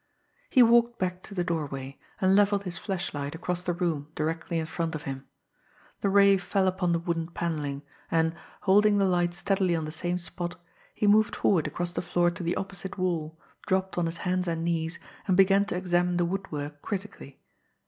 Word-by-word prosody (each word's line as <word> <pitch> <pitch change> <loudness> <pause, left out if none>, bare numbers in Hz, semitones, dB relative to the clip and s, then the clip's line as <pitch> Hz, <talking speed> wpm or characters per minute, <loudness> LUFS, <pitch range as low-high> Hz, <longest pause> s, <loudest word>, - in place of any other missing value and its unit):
He 255 - +7
walked 235 0 +4
back 180 0 -2
to 200 - -9
the 180 - +1
doorway, 140 -5 -4 0.2
and 190 0 +4
levelled 205 0 +3
his 175 -3 -3
flashlight 165 -7 -3
across 180 +1 -3
the 180 - -1
room 170 -5 -1
directly 165 +2 -2
in 160 - -1
front 165 0 -3
of 150 - -5
him. 135 0 -6 0.7
The 200 - +1
ray 200 0 +6
fell 190 +1 0
upon 185 -1 +1
the 170 - +3
wooden 165 -1 -2
panelling, 150 -5 -3 0.3
and, 160 0 +2 0.3
holding 205 +1 +5
the 200 - +3
light 175 -2 +1
steadily 190 -1 +1
on 160 -1 -2
the 155 - -5
same 175 +3 -2
spot, 175 0 -5 0.4
he - - 0
moved 210 +1 +4
forward 175 -7 +2
across 175 0 -3
the - - -2
floor 175 0 +2
to 175 - -8
the 170 0 -1
opposite 190 0 -5
wall, 160 -4 -2 0.3
dropped 190 0 0
on 175 -1 +1
his 165 +1 -4
hands 180 0 0
and 165 -1 -1
knees, 165 -1 -1 0.3
and 185 -2 +3
began 195 +1 +5
to 205 - -3
examine 180 -1 +1
the 175 - +2
woodwork 150 -6 -4
critically. 195 -9 -6
175 Hz, 190 wpm, -28 LUFS, 165-190 Hz, 0.7 s, He